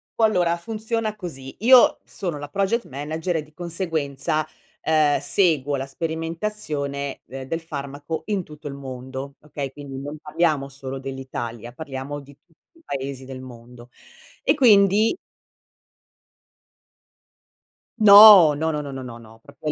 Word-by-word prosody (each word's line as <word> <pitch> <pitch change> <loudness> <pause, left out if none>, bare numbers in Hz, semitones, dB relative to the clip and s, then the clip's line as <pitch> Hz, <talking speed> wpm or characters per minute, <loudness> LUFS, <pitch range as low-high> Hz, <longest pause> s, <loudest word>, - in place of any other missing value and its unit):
Qu - - -3
allora 175 -5 +3
funziona 220 +2 -3
così, 135 -9 -8
io 250 +3 +6
sono 175 -7 -5
la 145 0 -7
project 200 +6 0
manager 160 +5 -3
e 155 - -3
di 150 0 -21
conseguenza, 160 -4 -2 0.4
ehm, 155 -2 +3
seguo 150 -7 +2
la 135 0 -3
sperimentazione 160 -3 -4
de 135 0 -8
del 165 +3 -2
farmaco 145 0 -6
in 205 -4 -1
tutto 150 -1 -11
il 140 - -5
mondo, 130 +1 -7
okay? 145 -2 -6
Quindi 135 -1 -8
non 145 +2 -7
parliamo 150 -3 0
solo 135 -1 -7
dell'Italia, 120 -3 -6
parliamo 140 0 -6
di 140 0 -16
tutti 175 - -33
i - - -22
paesi 135 -1 -5
del 130 -1 -8
mondo. 120 -1 -13 0.5
E - - +4
quindi 215 - +5 2.8
No, 200 -6 +10
no, 160 +2 -1
no, 150 - -2
no, 140 -1 -7
no, 135 - -6
no, 120 -2 -8
no, 115 -1 -16
proprio 145 +2 -7
a - - +2
150 Hz, 145 wpm, -23 LUFS, 135-175 Hz, 2.8 s, No